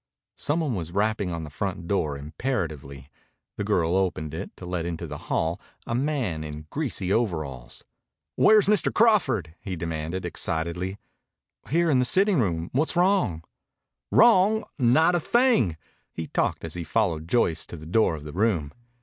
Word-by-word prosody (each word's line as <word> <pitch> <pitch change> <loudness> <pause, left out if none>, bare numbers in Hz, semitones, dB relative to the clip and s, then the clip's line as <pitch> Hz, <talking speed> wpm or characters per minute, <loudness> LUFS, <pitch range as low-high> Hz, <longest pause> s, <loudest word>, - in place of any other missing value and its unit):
Some 155 +3 -1
one 150 -6 -1
was 85 -5 -4
rapping 105 -1 0
on 85 -1 -4
the 75 - -8
front 85 +1 -4
door 75 -8 0
imperatively. 75 - -4 0.5
The 105 - -3
girl 90 -4 +1
opened 85 -5 -1
it, 80 - -5
to 90 - -9
let 90 -1 -2
into 85 -1 -4
the - - -7
hall 80 +2 0 0.2
a - - -3
man 125 - -1
in 75 0 -7
greasy 110 - -1
overalls. 75 - -2 0.5
"Where's 215 -1 +6
Mr. 210 0 +3
Crawford?" 200 - +2
he 95 -2 -4
demanded 80 +2 -4
excitedly. 90 +4 -2 0.7
"Here. 170 +2 +2
In 130 - +4
the 125 - +2
sitting 195 +4 +3
room. 85 -6 -1
What's 155 +7 +1
wrong?" 175 - +2 0.7
"Wrong! 220 -1 +5 0.2
Not 145 +8 +4
a 175 - +2
thing!" 230 - +2 0.3
He 80 - -5
talked - - -1
as 80 - -5
he 85 - -4
followed 80 -3 0
Joyce 85 -6 +1
to 85 - -8
the 80 - -10
door 90 0 +2
of 75 - -9
the 75 -1 -8
room. 90 -7 0
95 Hz, 165 wpm, -25 LUFS, 80-135 Hz, 0.7 s, Where's